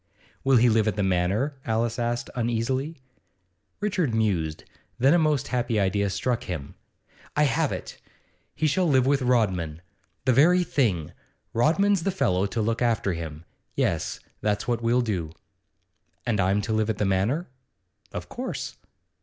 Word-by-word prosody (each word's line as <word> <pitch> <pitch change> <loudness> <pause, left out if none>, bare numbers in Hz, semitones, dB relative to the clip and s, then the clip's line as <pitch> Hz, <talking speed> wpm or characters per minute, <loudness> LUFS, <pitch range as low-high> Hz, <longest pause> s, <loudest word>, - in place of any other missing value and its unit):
'Will 135 -1 +5
he 120 +2 +5
live 110 -2 +3
at 105 - +1
the 105 - 0
Manor?' 95 +9 +1
Alice 115 +1 -1
asked 120 0 -2
uneasily. 125 +6 -1 0.8
Richard 185 - 0
mused; 90 -9 0 0.3
then 135 +5 +4
a 175 - +5
most 150 -3 +1
happy 120 -3 0
idea 100 +1 +1
struck 120 +4 -1
him. 75 -6 -5 0.6
'I 150 - +4
have 150 +1 +1
it! - - -6 0.6
He 155 - 0
shall 175 +5 +2
live 130 -3 +4
with 140 0 +2
Rodman. 95 -11 +1 0.5
The 130 - +4
very 175 +8 +5
thing! 100 - 0 0.4
Rodman's 170 - +3
the 195 - 0
fellow 100 - +1
to 110 +2 -2
look 115 +2 -1
after 115 -5 +1
him. 80 -1 -6 0.3
Yes; - - 0 0.2
that's 105 -1 0
what 120 -1 0
we'll 120 +2 +3
do.' 90 -9 -2 0.9
'And 115 -4 0
I'm 100 +2 +2
to 110 - -2
live 110 0 +1
at 110 - -1
the 105 - 0
Manor?' 100 - +1 0.7
'Of - - -6
course. - - -5
115 Hz, 155 wpm, -26 LUFS, 100-135 Hz, 0.9 s, Will